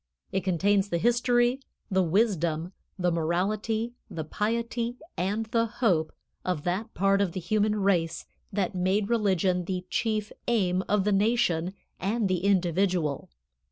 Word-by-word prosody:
It 190 Hz, -, -1 dB
contains 195 Hz, +2 st, +2 dB
the 170 Hz, -, 0 dB
history, 240 Hz, +4 st, +2 dB, 0.3 s
the 190 Hz, 0 st, +3 dB
wisdom, 175 Hz, -3 st, +1 dB, 0.2 s
the 180 Hz, -2 st, +1 dB
morality, 205 Hz, +8 st, -1 dB, 0.2 s
the 160 Hz, -, -4 dB
piety 230 Hz, +6 st, -2 dB, 0.2 s
and 205 Hz, +5 st, -1 dB
the 230 Hz, +1 st, +1 dB
hope 210 Hz, -9 st, +1 dB, 0.3 s
of 180 Hz, -5 st, -2 dB
that 195 Hz, +6 st, -2 dB
part 195 Hz, +1 st, +3 dB
of 185 Hz, -4 st, 0 dB
the -, -, -3 dB
human 215 Hz, +3 st, +1 dB
race 190 Hz, -5 st, +1 dB, 0.3 s
that 195 Hz, -1 st, -1 dB
made 190 Hz, +3 st, +1 dB
religion 190 Hz, -5 st, +2 dB
the 180 Hz, 0 st, -3 dB
chief 215 Hz, -2 st, 0 dB, 0.2 s
aim 190 Hz, -6 st, +2 dB
of 205 Hz, -1 st, +3 dB
the 210 Hz, -, +1 dB
nation 195 Hz, -4 st, +2 dB, 0.2 s
and 210 Hz, +2 st, 0 dB
the 185 Hz, -1 st, -1 dB
individual. 180 Hz, -5 st, +1 dB
195 Hz, 140 wpm, -27 LUFS, 180-220 Hz, 0.3 s, the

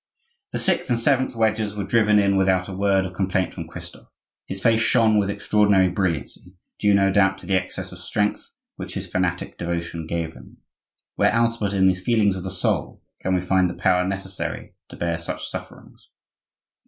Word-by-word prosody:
The -, -, -2 dB
sixth -, -, +1 dB
and 120 Hz, -, +2 dB
seventh 130 Hz, +1 st, +1 dB
wedges 110 Hz, -2 st, 0 dB
were 105 Hz, -, -3 dB
driven 105 Hz, +1 st, +3 dB
in 100 Hz, -1 st, +3 dB
without 95 Hz, -1 st, +2 dB
a 95 Hz, -, -6 dB
word 95 Hz, 0 st, +2 dB
of 90 Hz, -, -6 dB
complaint 95 Hz, -1 st, -1 dB
from -, -, -7 dB
Christophe. -, -, -10 dB, 0.4 s
His 95 Hz, -, -5 dB
face 115 Hz, +2 st, +3 dB
shone 110 Hz, -2 st, +4 dB
with 100 Hz, -1 st, 0 dB
extraordinary 100 Hz, -2 st, +3 dB
brilliancy, 90 Hz, 0 st, -3 dB, 0.2 s
due, 105 Hz, -1 st, +4 dB
no 95 Hz, 0 st, +3 dB
doubt, 95 Hz, 0 st, +3 dB
to -, -, -14 dB
the 95 Hz, -, -1 dB
excess 95 Hz, 0 st, -2 dB
of 90 Hz, -, -10 dB
strength 105 Hz, +4 st, -2 dB, 0.3 s
which -, -, -7 dB
his -, -, -4 dB
fanatic 90 Hz, -1 st, -2 dB
devotion 85 Hz, -1 st, -4 dB
gave 85 Hz, -1 st, -3 dB
him. 65 Hz, 0 st, -15 dB, 0.6 s
Where -, -, +4 dB
else 115 Hz, 0 st, +1 dB
but 100 Hz, -3 st, -2 dB
in 95 Hz, -1 st, +3 dB
the 95 Hz, -, +5 dB
feelings 100 Hz, +1 st, +1 dB
of 95 Hz, -, -6 dB
the 95 Hz, -, -4 dB
soul 90 Hz, -1 st, -2 dB, 0.2 s
can 95 Hz, 0 st, 0 dB
we 90 Hz, -, +1 dB
find 90 Hz, 0 st, +2 dB
the 85 Hz, -, -6 dB
power 90 Hz, +1 st, +2 dB
necessary 95 Hz, 0 st, -5 dB, 0.2 s
to -, -, -10 dB
bear 85 Hz, -1 st, -2 dB
such 85 Hz, -, -5 dB
sufferings? -, -, -10 dB
95 Hz, 190 wpm, -23 LUFS, 90-105 Hz, 0.6 s, the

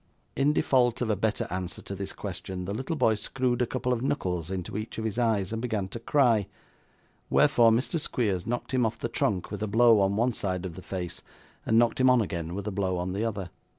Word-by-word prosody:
In 140 Hz, +2 st, +3 dB
default 125 Hz, -5 st, +2 dB
of 110 Hz, -, 0 dB
a -, -, +2 dB
better 110 Hz, +2 st, 0 dB
answer 90 Hz, 0 st, -4 dB
to -, -, -6 dB
this 100 Hz, 0 st, -5 dB
question, 90 Hz, -1 st, -6 dB
the 100 Hz, -, -3 dB
little 135 Hz, +9 st, -3 dB
boy 125 Hz, -6 st, +3 dB
screwed 125 Hz, +3 st, -1 dB
a 125 Hz, -, +2 dB
couple 125 Hz, 0 st, -1 dB
of 115 Hz, -, -2 dB
knuckles 90 Hz, -, -1 dB
into 95 Hz, -1 st, -4 dB
each 110 Hz, +2 st, -5 dB
of 110 Hz, -, -3 dB
his 110 Hz, +2 st, -2 dB
eyes 110 Hz, -4 st, +1 dB
and 115 Hz, -, -2 dB
began 110 Hz, -6 st, -1 dB
to 115 Hz, -, -6 dB
cry, 115 Hz, -5 st, +3 dB, 0.8 s
wherefore 115 Hz, -1 st, +5 dB
Mr 125 Hz, +9 st, +1 dB
Squeers 105 Hz, -, -1 dB
knocked 120 Hz, +3 st, -3 dB
him 130 Hz, -1 st, +3 dB
off 115 Hz, 0 st, 0 dB
the -, -, -3 dB
trunk 95 Hz, -3 st, -1 dB
with 105 Hz, -1 st, -5 dB
a 110 Hz, -, -1 dB
blow 115 Hz, +1 st, +5 dB
on 100 Hz, 0 st, +2 dB
one 120 Hz, +3 st, +2 dB
side 95 Hz, -3 st, -3 dB
of 90 Hz, -, -5 dB
the 95 Hz, -, -8 dB
face, 90 Hz, -2 st, -5 dB, 0.5 s
and 110 Hz, -, +4 dB
knocked 120 Hz, +1 st, +3 dB
him 130 Hz, -, +6 dB
on 125 Hz, -1 st, +5 dB
again 85 Hz, -5 st, -3 dB
with 100 Hz, 0 st, -4 dB
a 105 Hz, -, -2 dB
blow 95 Hz, -2 st, -1 dB
on 90 Hz, +1 st, -2 dB
the 100 Hz, +3 st, -1 dB
other. 100 Hz, -6 st, -3 dB
110 Hz, 235 wpm, -28 LUFS, 95-120 Hz, 0.8 s, him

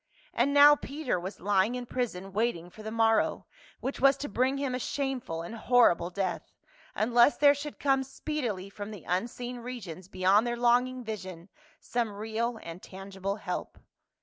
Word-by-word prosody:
And 245 Hz, +4 st, +2 dB
now 290 Hz, +1 st, +8 dB
Peter 280 Hz, -, -3 dB
was 185 Hz, +2 st, -7 dB
lying 200 Hz, +4 st, +2 dB
in 250 Hz, 0 st, -4 dB
prison 195 Hz, -7 st, -4 dB
waiting 195 Hz, -6 st, -1 dB
for 215 Hz, -, -12 dB
the 215 Hz, -, -5 dB
morrow 225 Hz, 0 st, +2 dB, 0.4 s
which 270 Hz, -, -3 dB
was 275 Hz, 0 st, +5 dB
to 290 Hz, -, -4 dB
bring 255 Hz, +6 st, +1 dB
him 275 Hz, -2 st, -2 dB
a 250 Hz, -, -1 dB
shameful 255 Hz, -, -3 dB
and 170 Hz, -, -7 dB
horrible 230 Hz, -7 st, +3 dB
death, 185 Hz, -1 st, -2 dB, 0.5 s
unless 235 Hz, +5 st, +4 dB
there 285 Hz, -1 st, +6 dB
should 290 Hz, +1 st, -7 dB
come 270 Hz, -1 st, +2 dB
speedily 250 Hz, -9 st, -4 dB
from 205 Hz, +1 st, -8 dB
the 205 Hz, -7 st, -9 dB
unseen 240 Hz, +7 st, -2 dB
regions 200 Hz, -8 st, -7 dB
beyond 190 Hz, +5 st, +3 dB
their 240 Hz, 0 st, -2 dB
longing 245 Hz, +1 st, +2 dB
vision 190 Hz, -5 st, -7 dB, 0.3 s
some 235 Hz, -3 st, -2 dB
real 225 Hz, +3 st, -2 dB
and 165 Hz, +2 st, -8 dB
tangible 195 Hz, +1 st, -5 dB
help. 215 Hz, -, -5 dB
230 Hz, 165 wpm, -29 LUFS, 195-255 Hz, 0.5 s, now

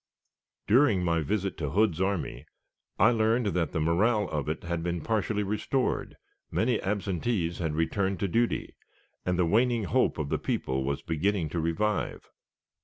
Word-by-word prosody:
During 110 Hz, -5 st, +4 dB
my 85 Hz, -2 st, +1 dB
visit 95 Hz, +5 st, -2 dB
to 75 Hz, -3 st, -2 dB
Hood's 95 Hz, -1 st, +2 dB
army, 95 Hz, -3 st, -2 dB, 0.5 s
I 110 Hz, +5 st, +5 dB
learned 115 Hz, +1 st, +2 dB
that 85 Hz, -4 st, 0 dB
the -, -, -1 dB
morale 105 Hz, +8 st, +2 dB
of 75 Hz, -1 st, -2 dB
it 80 Hz, -, -3 dB
had 85 Hz, -1 st, -2 dB
been 85 Hz, 0 st, -2 dB
partially 105 Hz, 0 st, 0 dB
restored, 105 Hz, +6 st, -1 dB, 0.3 s
many 115 Hz, 0 st, +1 dB
absentees 95 Hz, -2 st, -1 dB
had 80 Hz, -3 st, -1 dB
returned 95 Hz, +3 st, 0 dB
to 100 Hz, -, +1 dB
duty, 115 Hz, +6 st, 0 dB, 0.5 s
and 90 Hz, -1 st, +1 dB
the 90 Hz, -, +3 dB
waning 115 Hz, +5 st, +2 dB
hope 90 Hz, -, +1 dB
of 75 Hz, -2 st, -3 dB
the -, -, 0 dB
people 65 Hz, +1 st, -1 dB
was 70 Hz, 0 st, -2 dB
beginning 85 Hz, +1 st, 0 dB
to 85 Hz, -, -2 dB
revive. 95 Hz, +6 st, -1 dB
95 Hz, 160 wpm, -28 LUFS, 85-110 Hz, 0.5 s, I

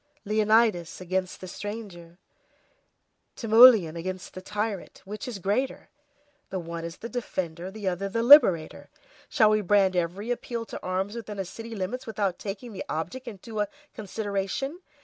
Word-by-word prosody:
Leonidas 215 Hz, -4 st, +2 dB
against 185 Hz, 0 st, -3 dB
the 185 Hz, -, -7 dB
stranger, 185 Hz, -4 st, -8 dB, 1.2 s
Timoleon 225 Hz, -7 st, +7 dB
against 185 Hz, +2 st, -5 dB
the 185 Hz, -, -8 dB
tyrant, 210 Hz, 0 st, -4 dB
which 210 Hz, +4 st, -6 dB
is 245 Hz, -, -5 dB
the 195 Hz, -, -8 dB
greater? 210 Hz, +8 st, -1 dB, 0.6 s
the 190 Hz, -, -3 dB
one 170 Hz, -1 st, -5 dB
is 170 Hz, 0 st, -6 dB
the 230 Hz, -, -6 dB
defender, 185 Hz, -8 st, -4 dB
the 205 Hz, 0 st, -6 dB
other 190 Hz, +2 st, -1 dB
the 230 Hz, +4 st, -1 dB
liberator. 230 Hz, -, +6 dB, 0.4 s
Shall 215 Hz, -2 st, +4 dB
we 215 Hz, 0 st, +3 dB
brand 195 Hz, -1 st, +3 dB
every 180 Hz, +6 st, -1 dB
appeal 235 Hz, -1 st, -3 dB
to -, -, -8 dB
arms 190 Hz, +3 st, -2 dB
within 220 Hz, -3 st, -7 dB
a 195 Hz, -, -2 dB
city's 225 Hz, +4 st, -8 dB
limits 205 Hz, +8 st, -4 dB
without 200 Hz, -4 st, -1 dB
taking 210 Hz, +3 st, -6 dB
the 190 Hz, -, -5 dB
object 175 Hz, +12 st, -4 dB
into 215 Hz, 0 st, -7 dB
a 205 Hz, -, +1 dB, 0.3 s
consideration? 210 Hz, -, -3 dB
200 Hz, 155 wpm, -27 LUFS, 185-225 Hz, 1.2 s, Timoleon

